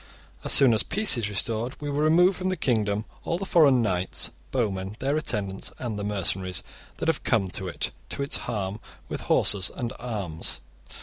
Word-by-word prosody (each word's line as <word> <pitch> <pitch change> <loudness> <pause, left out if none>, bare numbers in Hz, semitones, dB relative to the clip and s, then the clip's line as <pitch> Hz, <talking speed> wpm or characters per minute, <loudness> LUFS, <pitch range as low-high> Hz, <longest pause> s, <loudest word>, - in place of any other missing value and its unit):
* - - -27
As - - -2
soon 130 -4 +7
as 110 - +2
peace 210 -5 +4
is 115 -4 -1
restored, 115 +4 -1
we 145 - -5
will 145 0 -1
remove 175 +5 +5
from 185 0 -2
the 185 - -1
kingdom 105 -3 0 0.2
all 170 - -1
the 195 - -4
foreign 145 - +5
knights, 90 -3 -1 0.2
bowmen, 100 -5 -2
their 140 +4 0
attendants, 100 -10 -2
and 115 -5 -4
the - - -3
mercenaries 95 -2 -2 0.3
that - - -3
have - - +1
come 95 - +1
to 95 - -4
it, 90 - -2 0.2
to 140 - -3
its 140 - -1
harm, 100 -2 -3 0.3
with - - -4
horses 95 -3 +4
and 120 -1 -3
arms. 100 -10 -4
110 Hz, 190 wpm, -26 LUFS, 100-140 Hz, 0.3 s, soon